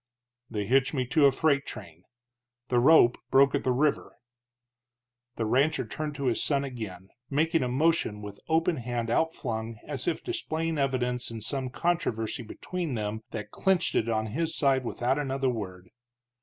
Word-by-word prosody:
"They 105 -2 -2
hitched 135 +5 +2
me 130 -2 0
to 145 +2 +5
a - - +4
freight 140 +1 +2
train. 85 - -10 0.6
The 125 - +3
rope 125 -2 +6
broke 135 +1 +5
at 140 - 0
the 130 - +2
river." 140 +4 0 1.2
The 115 - -1
rancher 140 +8 +2
turned 155 -2 -5
to 140 -1 -4
his 120 -3 +1
son 140 -2 +1
again, 105 -8 -7 0.2
making 160 +4 +2
a 125 - 0
motion 130 -5 +1
with 100 -1 -8
open 165 +1 +2
hand 120 -2 -3
outflung 115 -7 -1
as - - -4
if - - -1
displaying 160 -1 -2
evidence 125 -3 0
in 115 -1 -6
some 130 +4 -2
controversy 125 -9 -1
between 165 +5 -4
them 105 0 -3
that 105 -1 -6
clinched 190 -3 +1
it 115 - +1
on 110 -1 0
his 165 +3 -1
side 135 -2 +3
without 125 +3 0
another 135 -2 0
word. 95 -6 -6
130 Hz, 165 wpm, -28 LUFS, 115-150 Hz, 1.2 s, rope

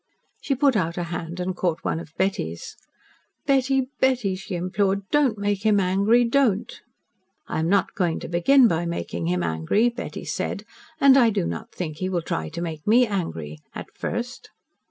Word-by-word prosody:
She 275 - 0
put 275 -1 +3
out 170 -4 0
a 175 - -1
hand 170 0 -5
and 180 0 -2
caught 175 -3 -1
one - - 0
of 165 - -10
Betty's. 85 - -2 0.7
"Betty, 270 -1 +2
Betty," 250 -7 +2
she 190 0 -6
implored. 195 +2 0
"Don't 280 -7 +3
make 205 0 -1
him 215 -2 +4
angry. 200 +6 +3
Don't." 235 -4 +1 0.7
"I - - -2
am 160 +1 0
not 200 -1 +2
going 175 -4 0
to - - -6
begin 240 +10 +5
by 170 -3 0
making 85 - -3
him 90 0 0
angry," 80 - +1
Betty 240 +1 -7
said. - - -3 0.4
"And 275 -1 +7
I 235 -3 +5
do 200 - 0
not 85 0 -5
think 155 -4 -5
he 185 +2 -2
will 175 -3 -1
try 80 - -3
to 170 - -6
make 160 -1 -6
me 240 +4 +6
angry 85 - -4 0.2
at - - -7
first." - - -5
190 Hz, 180 wpm, -24 LUFS, 165-230 Hz, 0.7 s, And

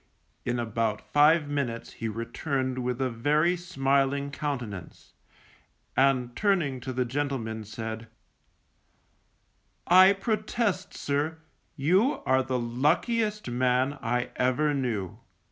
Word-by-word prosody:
In 120 0 0
about 115 -2 -1
five 150 +1 +5
minutes 140 -5 -3
he 115 - -4
returned 130 +4 -2
with 125 0 -2
a 130 -1 0
very 150 +9 +2
smiling 140 -5 0
countenance, 120 - -5 0.8
and 130 -3 +2
turning 175 -11 +1
to 130 +2 -5
the 125 0 0
gentleman, 120 -4 -3
said, 110 +1 -6 1.8
_I 190 +2 +7
protest 215 -2 -1
sir, 145 +3 -1 0.4
you 185 - +2
are 130 0 +3
the 130 -1 -1
luckiest 175 - 0
man 130 +3 +1
I 125 0 -1
ever 145 +4 +2
knew. 110 -7 -2
135 Hz, 110 wpm, -27 LUFS, 120-155 Hz, 1.8 s, I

